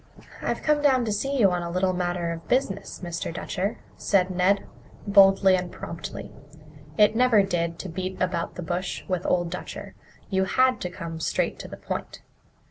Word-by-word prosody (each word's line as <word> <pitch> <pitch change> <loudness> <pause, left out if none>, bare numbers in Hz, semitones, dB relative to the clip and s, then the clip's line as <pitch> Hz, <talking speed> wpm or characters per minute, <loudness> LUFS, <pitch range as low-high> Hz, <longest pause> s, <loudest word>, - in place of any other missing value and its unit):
"I've - - -2
come 300 -1 +3
down 260 -4 +4
to 215 - -1
see 270 +7 -1
you 200 -5 +5
on 180 -1 -1
a 170 - -4
little 185 +2 +1
matter 175 -1 -1
of 165 0 -7
business, 205 -9 -1
Mr. 170 -1 -3
Dutcher," 185 +4 -3 0.2
said 190 -2 +2
Ned, 185 +2 +2 0.4
boldly 195 -1 +6
and 180 -1 -3
promptly. 165 - -7 0.7
It 210 +1 +5
never 235 -4 +5
did 170 -3 -1
to - - -6
beat 185 +3 -4
about 180 -2 -1
the 180 - -5
bush 180 +2 -3
with 185 -3 -2
Old 175 -1 +1
Dutcher; 180 - -7 0.4
you 190 0 +2
had 255 +5 +2
to 180 - -2
come 170 -3 -7
straight - - -1
to - - -7
the - - -9
point. - - -6
185 Hz, 180 wpm, -25 LUFS, 175-205 Hz, 0.7 s, boldly